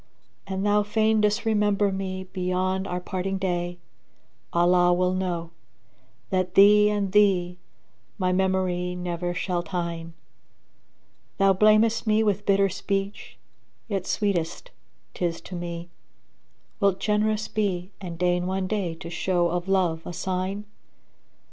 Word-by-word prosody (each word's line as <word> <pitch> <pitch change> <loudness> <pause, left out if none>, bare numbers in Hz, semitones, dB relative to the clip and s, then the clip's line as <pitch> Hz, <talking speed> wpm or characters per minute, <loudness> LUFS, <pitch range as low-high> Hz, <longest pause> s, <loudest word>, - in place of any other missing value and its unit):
An 190 0 -3
thou 205 0 +3
fain 215 +1 +2
disremember 210 -1 +2
me 190 -1 -4
beyond 185 +1 -2
our 180 - -2
parting 190 +1 -3
day, 175 -2 -2 0.4
* 65 0 -42
Allah 175 +1 +4
will 180 +1 +2
know, 175 -3 -2 0.8
that 185 -1 0
thee 210 +1 +7
and 205 -2 -1
thee 185 -4 +3 0.6
my 185 -3 +1
memory 185 -1 0
never 175 0 -3
shall 180 -1 -1
tyne. 170 -2 -4 1.2
Thou 195 -1 +4
blamest 215 +3 +3
me 215 +1 +3
with 205 -1 0
bitter 200 0 +4
speech 195 +1 -4 0.5
yet 195 -4 -3
sweetest 195 - -1 0.4
'tis 170 -2 -2
to - - -11
me; 170 -1 -5 0.5
* - - -42
Wilt 200 -2 +2
generous 215 0 0
be 190 -3 -2
and 175 -3 -6
deign 180 0 +1
one 190 0 -1
day 185 -4 -2
to 165 +1 -9
show 175 0 +1
of 175 +1 -2
love 180 -4 +1
a 175 - -5
sign? 190 +3 -3
185 Hz, 130 wpm, -25 LUFS, 175-205 Hz, 1.2 s, thee